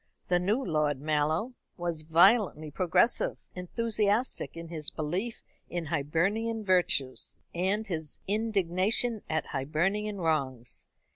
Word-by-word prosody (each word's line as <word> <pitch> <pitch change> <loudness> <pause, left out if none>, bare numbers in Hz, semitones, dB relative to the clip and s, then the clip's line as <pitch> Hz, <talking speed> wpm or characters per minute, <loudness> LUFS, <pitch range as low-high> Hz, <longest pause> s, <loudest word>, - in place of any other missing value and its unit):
The 180 0 +4
new 205 +7 +1
Lord 150 -4 +1
Mallow 155 - 0 0.2
was 170 -3 -2
violently 160 -1 +4
progressive, 180 - +2 0.2
enthusiastic 210 +2 0
in 165 0 -7
his 155 -3 -1
belief 180 +10 -3 0.3
in 175 -1 -3
Hibernian 195 +9 0
virtues, 175 -8 +2 0.2
and 190 +5 0
his 160 -6 -5
indignation 210 +2 +1
at 160 -1 0
Hibernian 190 +10 -1
wrongs. 135 -8 -2
175 Hz, 110 wpm, -29 LUFS, 155-210 Hz, 0.3 s, The